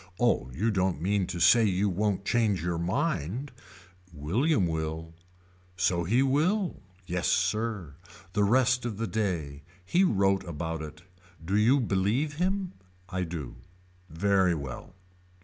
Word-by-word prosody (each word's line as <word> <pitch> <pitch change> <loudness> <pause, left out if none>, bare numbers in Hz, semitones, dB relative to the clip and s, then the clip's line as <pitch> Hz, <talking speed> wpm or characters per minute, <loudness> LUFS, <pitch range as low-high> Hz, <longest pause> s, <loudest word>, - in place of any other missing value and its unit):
Oh 120 - +2
you 105 - 0
don't 95 -5 0
mean 95 +2 0
to 90 -1 -5
say 115 +7 +6
you 100 -1 +2
won't 100 +1 -1
change 105 -8 +1
your 85 -1 -1
mind. 120 - -2 0.6
William 95 - +1
will. 80 0 -3 0.6
So 85 -1 +1
he 120 +9 +3
will. 170 +9 +1 0.2
Yes 90 -1 -2
sir. 105 -8 0 0.4
The 105 - +2
rest 125 +3 +3
of 115 -4 -4
the 115 - -2
day. 85 -9 -2 0.2
He 180 - +3
wrote 95 - +2
about 80 -1 -4
it. 80 +2 -9 0.4
Do 95 +4 -1
you 115 +7 +4
believe 120 +7 0
him. 185 +1 -1 0.4
I 95 +1 -2
do. 80 -8 -5 0.5
Very 95 +1 +2
well. 70 +4 -7
95 Hz, 135 wpm, -28 LUFS, 85-120 Hz, 0.6 s, say